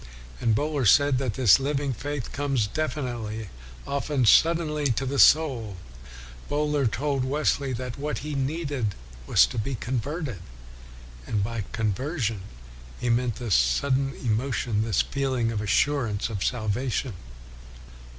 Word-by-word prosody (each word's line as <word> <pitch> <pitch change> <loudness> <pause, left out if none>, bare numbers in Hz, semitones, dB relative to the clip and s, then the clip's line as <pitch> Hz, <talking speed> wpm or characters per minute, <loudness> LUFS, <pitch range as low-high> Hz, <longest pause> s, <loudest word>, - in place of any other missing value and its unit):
And 115 -2 +2
Bohler 145 -1 0
said 140 +4 +5
that 130 -6 -2
this 125 -3 +6
living 140 0 -1
faith 145 +1 -5
comes 140 -6 0
definitely, 115 -5 -3 0.4
often 140 -1 0
suddenly, 155 +3 +4
into 130 +2 0
the 135 +1 -1
soul. 125 - +4 0.7
Bohler 150 -2 +1
told 135 +3 -1
Wesley 140 0 0
that 125 +1 -5
what 150 +1 -2
he 150 - -4
needed 140 - -2 0.3
was - - +6
to 65 - -4
be 130 +5 -2
converted, 130 - -3 0.9
and 105 -2 0
by 115 -1 -3
conversion 115 - -2 0.6
he 120 - 0
meant 120 -1 +1
this 120 -6 -2
sudden 130 - +2
emotion, 115 -2 -1
this 110 -4 +1
feeling 130 -4 -1
of 105 -2 -2
assurance 115 -1 +1
of 100 -4 -3
salvation. 120 +2 -1
130 Hz, 130 wpm, -26 LUFS, 110-145 Hz, 0.9 s, this